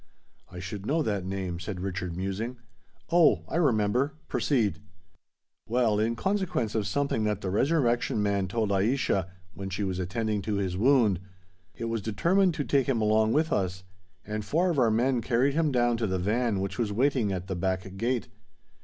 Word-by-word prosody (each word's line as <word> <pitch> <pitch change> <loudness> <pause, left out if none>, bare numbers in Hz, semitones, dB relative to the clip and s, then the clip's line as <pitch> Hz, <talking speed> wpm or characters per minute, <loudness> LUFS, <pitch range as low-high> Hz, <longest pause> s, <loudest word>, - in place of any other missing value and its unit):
"I 90 - -11
should 95 +3 -6
know 155 +3 +1
that 100 -6 -2
name," 95 -3 -3
said 90 +1 -5
Richard, 90 -2 -4
musing. 100 +6 -3 0.5
"Oh! 155 - +5
I - - -2
remember! 125 -2 +2
Proceed." 110 - +1 0.9
"Well—in 115 -1 +1
consequence 185 - -1
of 110 -3 0
something 140 -6 0
that 105 -1 -1
the 95 - -3
Resurrection 120 - +1
Man 100 -2 0
told 110 +1 -1
Aischa, 100 -2 +1 0.2
when 95 0 -6
she 100 +2 -3
was 95 -2 -2
attending 105 +3 -1
to 105 +2 -2
his 95 -2 -1
wound, 110 -4 +3 0.6
it 115 - -5
was 115 -1 -2
determined 170 - +2
to 145 - -1
take 140 -1 +1
him 125 -4 +2
along 110 +1 +3
with 155 +2 +2
us; 95 -1 -1 0.4
and 105 0 -3
four 175 - +1
of 150 - 0
our 120 -3 +4
men 120 +3 +2
carried 125 +4 +2
him 155 -1 +1
down 120 -2 +2
to 115 -1 -1
the 95 -1 -1
van 105 +2 0
which 100 +4 -4
was 110 -3 0
waiting 125 -1 +1
at 90 -2 -3
the 95 -1 -4
back 95 +1 -2
gate. 120 +3 -1
110 Hz, 180 wpm, -28 LUFS, 95-125 Hz, 0.9 s, Oh